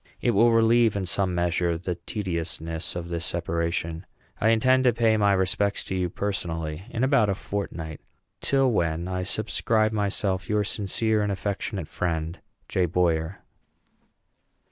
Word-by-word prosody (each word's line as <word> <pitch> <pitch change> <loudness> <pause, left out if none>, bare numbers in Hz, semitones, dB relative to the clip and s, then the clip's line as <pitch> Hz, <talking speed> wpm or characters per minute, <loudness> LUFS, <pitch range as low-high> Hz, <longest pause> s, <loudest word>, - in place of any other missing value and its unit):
It 120 - +2
will 115 +2 +5
relieve, 115 -1 +4
in 100 -2 -1
some 90 0 +1
measure, 85 -1 +1
the 90 +2 -3
tediousness 85 -3 -4
of 85 -1 -5
this 85 -1 -3
separation. 85 0 -2 0.3
I 110 - +3
intend 130 +3 +4
to 125 - +5
pay 115 -1 +3
my 100 -2 +3
respects 95 +2 +1
to 95 - -4
you 90 -1 0
personally 85 -4 -3
in 115 - -2
about 130 -6 +4
a 100 - +1
fortnight; 85 -7 -5 0.4
till 135 -2 +2
when 85 -4 0
I 90 0 -2
subscribe 110 +2 0
myself 100 -3 -1
your 105 0 +2
sincere 105 +2 0
and 105 -1 0
affectionate 100 - -3
friend, 85 0 -2 0.3
J. 90 -2 +1
BOYER. 85 +1 0
95 Hz, 145 wpm, -26 LUFS, 85-110 Hz, 0.4 s, will